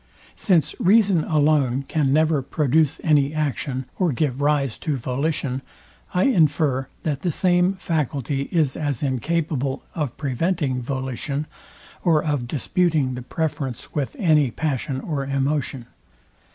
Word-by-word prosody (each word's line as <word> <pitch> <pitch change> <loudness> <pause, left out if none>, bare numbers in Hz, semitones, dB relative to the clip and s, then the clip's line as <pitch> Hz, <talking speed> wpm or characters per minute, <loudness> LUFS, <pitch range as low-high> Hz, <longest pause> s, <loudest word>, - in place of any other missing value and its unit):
Since 165 -6 +2
reason 195 -4 +4
alone 145 -4 +2
can 140 -1 0
never 155 0 +3
produce 150 +2 +1
any 145 -2 +3
action, 140 -3 -2
or 180 -4 +2
give 135 0 -1
rise 145 -4 +1
to 150 -5 -1
volition, 135 +1 -2 0.5
I 180 - +2
infer, 150 - +2 0.2
that 145 -4 -2
the 180 - 0
same 180 +3 +2
faculty 140 - -2
is 155 -6 +1
as 145 -4 -2
incapable 140 0 -1
of 150 -7 -3
preventing 140 -1 -1
volition, 135 +3 -3 0.6
or 160 -4 +3
of 145 -6 -1
disputing 150 0 +1
the 125 - -5
preference 135 -2 -4
with 140 -6 -2
any 155 -7 +3
passion 135 0 -2
or 145 -3 -2
emotion. 135 -2 -1
145 Hz, 125 wpm, -23 LUFS, 135-160 Hz, 0.6 s, reason